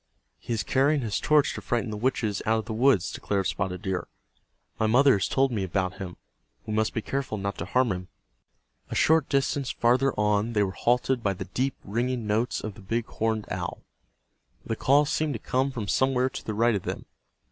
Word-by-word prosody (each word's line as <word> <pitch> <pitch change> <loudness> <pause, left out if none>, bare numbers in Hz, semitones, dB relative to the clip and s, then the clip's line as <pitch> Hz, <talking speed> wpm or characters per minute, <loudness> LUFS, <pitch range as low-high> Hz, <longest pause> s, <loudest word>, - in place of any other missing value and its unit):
"He - - -8
is 110 - -1
carrying 140 +2 +2
his 110 -4 -1
torch 150 -2 +3
to - - -6
frighten 120 -2 -1
the - - -3
witches 110 -2 -1
out 110 +1 +3
of 110 - -3
the 110 - -4
woods," 120 -4 +3
declared 100 -2 -2
Spotted 90 +1 -2
Deer. 95 -3 -2 0.7
"My 110 - +2
mother 130 +5 +5
has 100 0 +1
told 135 0 +2
me 105 -5 -1
about 95 0 -2
him. 90 -2 -6 0.5
We 110 - -4
must 110 0 0
be 110 - -1
careful 135 -5 -2
not 100 0 -3
to - - -3
harm 125 +4 +2
him." 90 0 -4 0.8
A - - -4
short 160 -2 +3
distance 140 0 0
farther 130 +3 +2
on 105 +2 +1
they 105 -2 +3
were 95 - -1
halted 125 +4 +1
by 100 -3 +1
the 95 +1 -6
deep 130 +8 -1
ringing 120 +3 -1
notes 110 +4 0
of 110 - -4
the 110 - -14
big 115 +4 -2
horned 110 -1 -1
owl. 90 -1 -4 0.8
The 115 - -2
call 140 +6 +4
seemed 150 +1 0
to 115 - -4
come 130 +5 0
from 115 -6 -5
somewhere 130 +5 +2
to - - -7
the 110 - -4
right 115 +2 +3
of 100 - -1
them. - - -5
115 Hz, 210 wpm, -27 LUFS, 100-130 Hz, 0.8 s, mother